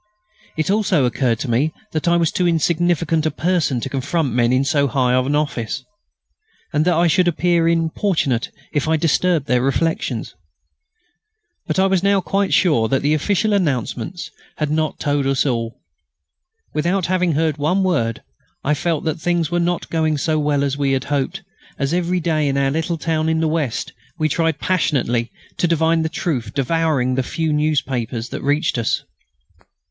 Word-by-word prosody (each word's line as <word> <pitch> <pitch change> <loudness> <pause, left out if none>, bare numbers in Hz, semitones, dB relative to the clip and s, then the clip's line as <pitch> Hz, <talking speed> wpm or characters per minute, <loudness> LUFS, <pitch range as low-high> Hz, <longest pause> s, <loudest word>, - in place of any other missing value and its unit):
It 160 +4 0
also 195 -9 +2
occurred 120 -1 +1
to - - -3
me 130 +7 +1 0.2
that 155 +1 -2
I 170 0 +4
was 165 -2 +1
too 180 - +1
insignificant 165 -1 +1
a - - +2
person 165 -7 0
to - - -3
confront 140 +2 -1
men 125 +2 +2
so 140 +1 +2
high 125 -2 +1
in 130 +3 +1
office, 145 -7 -2 0.9
and 150 +1 +2
that 175 -1 +3
I 170 +2 +3
should 175 +2 +3
appear 170 0 +2
importunate 165 - 0 0.2
if 145 0 0
I 160 0 +3
disturbed 165 0 +1
their 125 -3 +2
reflections. 135 -3 -1 1.3
But - - -1
I 190 - +4
was 190 -2 +2
now 200 0 +3
quite 195 +2 -1
sure 145 -11 +3
that 135 +3 0
the 145 +2 +2
official 205 +7 +1
announcements 150 - -2 0.3
had 150 -1 -1
not 155 0 -1
told 145 -1 0
us 135 0 +1
all. 115 -3 -2 0.9
Without 175 +4 0
having 180 -2 +1
heard 155 0 0
one 170 +7 +1
word, 115 -12 0 0.4
I 150 - +2
felt 160 +1 -1
that 160 0 -2
things 175 -2 0
were 175 - +1
not 175 0 -1
going 155 -2 +1
so 155 +2 0
well 145 -1 +1
as 140 -1 0
we 140 -1 0
had 130 -1 0
hoped, 135 -2 -2 0.3
as 140 +3 -1
every 180 +1 0
day 155 -3 0
in 140 0 0
our 135 -1 +2
little 165 +3 -1
town 160 0 0
in 160 0 +1
the 160 - +1
west 155 -7 -2 0.2
we 155 -2 +1
tried 165 0 0
passionately 125 -10 0 0.3
to 175 - +2
divine 165 0 +2
the 160 - -1
truth, 125 -9 -3
devouring 140 -2 +1
the 130 - +1
few 160 +4 -2
newspapers 130 -6 -1
that - - -5
reached 145 -1 +1
us. 115 - 0
155 Hz, 175 wpm, -20 LUFS, 135-170 Hz, 1.3 s, I